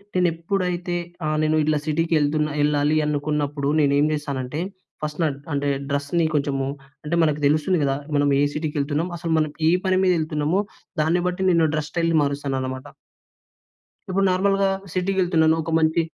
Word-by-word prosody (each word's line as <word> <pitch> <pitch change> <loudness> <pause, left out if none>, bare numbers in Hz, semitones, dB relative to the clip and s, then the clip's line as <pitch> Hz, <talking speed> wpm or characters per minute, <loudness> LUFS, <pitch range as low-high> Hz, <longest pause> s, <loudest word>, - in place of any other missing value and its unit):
నేను 180 -1 +3
ఎప్పుడైతే 175 0 -2 0.3
ఆహ్, 155 0 0
నేను 155 0 +2
ఇట్లా 155 0 +1
సిటీకెళ్తున 155 -1 +1
ఎళ్ళాలి 150 +1 +2
అనుకున్నప్పుడు 145 -1 -1
నేనేం 145 0 +3
చేస్తానంటే 140 -2 -3 0.4
ఫస్ట్ 150 +1 -4
నా - - +3
డ్ - - -15
అంటే 145 0 -1 0.2
డ్రెస్‌ని 145 +4 0
కొంచెము 140 -2 0 0.4
అంటే 150 +3 -1
మనకు 150 -2 +1
తెలుస్తుంది 155 +5 +2
కదా! 135 -1 +1 0.2
మనం 145 0 +3
ఏ - - +3
సిటీకెళ్తున్నాము? 150 +2 -2
అసలు 165 -1 -4
మనం 155 -1 +1 0.2
ఏ - - +4
పని 185 0 +2
మీద 185 - +4
ఎళ్తున్నామో! 155 +3 0 0.4
దాన్ని 165 +3 +2
బట్టి 180 +1 -2
నేను 165 -2 +3
డ్రెస్ 155 0 -2
స్టైల్ 165 0 0
మారుస్తాననమాట. 135 -2 -3 1.2
ఇప్పుడు 195 +1 +1
నార్మల్‌గా 195 +1 +2 0.2
సిటీకి 190 +1 -1
వెళ్తున్నాను. 160 -3 +3
ఒక 165 - -4
మంచి 160 +1 +2
155 Hz, 150 wpm, -23 LUFS, 145-170 Hz, 1.2 s, ఏ